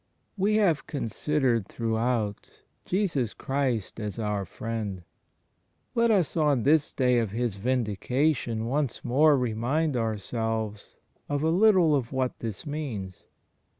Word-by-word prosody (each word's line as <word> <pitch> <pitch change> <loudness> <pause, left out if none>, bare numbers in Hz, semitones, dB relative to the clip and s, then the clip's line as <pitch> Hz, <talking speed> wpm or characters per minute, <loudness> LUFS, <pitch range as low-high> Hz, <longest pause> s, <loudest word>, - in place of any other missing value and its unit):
We 205 +1 +2
have 185 -8 +2
considered 130 -4 0
throughout 115 -2 -2 0.2
Jesus 165 - 0
Christ 130 -7 -2
as 105 -1 -4
our 105 -3 -1
Friend. 105 -5 -5 0.9
Let 235 0 +3
us 195 -8 +2
on 145 -7 +2
this 150 +1 +3
day 125 -2 +2
of 115 -3 -1
His 115 -1 -2
Vindication 125 +2 0
once 135 +1 -2
more 145 +4 +5
remind 125 +6 0
ourselves 110 -1 -3 0.3
of 145 0 -1
a 160 - +3
little 185 -4 +5
of 125 -4 -2
what 130 -2 -1
this 110 -4 -5
means. 125 - -5
125 Hz, 120 wpm, -27 LUFS, 110-150 Hz, 0.9 s, more